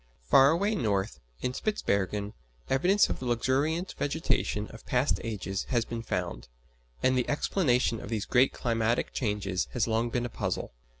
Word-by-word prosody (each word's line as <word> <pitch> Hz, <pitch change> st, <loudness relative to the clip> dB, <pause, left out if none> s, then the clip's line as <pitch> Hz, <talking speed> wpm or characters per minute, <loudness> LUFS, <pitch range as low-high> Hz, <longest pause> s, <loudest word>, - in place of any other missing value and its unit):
Far 135 Hz, -, +6 dB
away 200 Hz, +7 st, +2 dB
north, 100 Hz, -, -1 dB, 0.2 s
in 125 Hz, -, -1 dB
Spitzbergen, 105 Hz, -, -1 dB, 0.4 s
evidence 180 Hz, +10 st, +4 dB
of -, -, -3 dB
the 130 Hz, -, -5 dB
luxuriant 140 Hz, +9 st, 0 dB
vegetation 145 Hz, -, 0 dB
of -, -, -12 dB
past 125 Hz, +3 st, +1 dB
ages 100 Hz, -4 st, -3 dB
has 120 Hz, -3 st, 0 dB
been 115 Hz, -1 st, -5 dB
found; -, -, -3 dB, 0.6 s
and 130 Hz, 0 st, +4 dB
the 125 Hz, -1 st, 0 dB
explanation 130 Hz, -, +1 dB
of -, -, -8 dB
these 110 Hz, -3 st, -2 dB
great 130 Hz, +1 st, +4 dB
climatic 115 Hz, 0 st, 0 dB
changes 105 Hz, -5 st, -1 dB
has 125 Hz, -, +1 dB
long 115 Hz, +1 st, +1 dB
been 120 Hz, +1 st, -1 dB
a -, -, -3 dB
puzzle. -, -, -3 dB
120 Hz, 160 wpm, -29 LUFS, 105-135 Hz, 0.6 s, Far